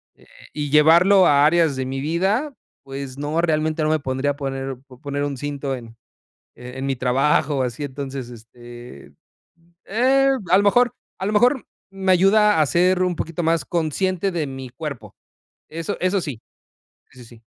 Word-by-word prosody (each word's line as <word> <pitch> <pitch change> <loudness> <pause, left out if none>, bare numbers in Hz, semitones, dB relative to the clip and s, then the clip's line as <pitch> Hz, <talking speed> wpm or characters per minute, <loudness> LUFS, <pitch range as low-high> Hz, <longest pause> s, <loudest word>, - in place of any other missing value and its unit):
eh, - - -23 0.3
y, 150 -1 -3
¿llevarlo 170 +6 +6
a 145 -2 +5
áreas 160 -2 +3
de 130 0 -3
mi 135 +1 -4
vida?, 190 - 0 0.3
pues 135 -1 -7
no, 145 +3 -2
realmente, 155 -1 0
no 155 - +1
me 155 0 +1
podría 135 +1 -2
poner 135 -2 -4
po 125 -3 -16
poner 145 -1 -3
un 145 -1 -3
cinto 140 0 -4
en 115 -2 -11 0.6
en 125 +2 -7
mi 135 -1 -1
trabajo, 135 +2 +1
así 125 +3 -4
entonces, 135 -2 -6
este, 120 - -13 0.7
eh, 265 +5 +2 0.2
a 185 - +6
lo 200 - +2
mejor 245 +4 +3 0.3
a 190 - -3
lo 210 - -1
mejor, 245 +5 +3 0.3
me 190 -1 0
ayuda 195 0 +4
a - - +4
ser 180 +5 +2
un 180 -1 0
poquito 165 +1 -4
más 165 0 +1
consciente 185 +3 -1
de 165 -4 -2
mi 135 -1 -8
cuerpo. 125 -7 -8 0.6
Eso 165 +1 -4
eso 185 +2 +1
sí. 135 -9 -6 0.7
Sí, 130 - -17
sí, - - -11
sí. 115 0 -17
150 Hz, 170 wpm, -21 LUFS, 135-180 Hz, 0.7 s, llevarlo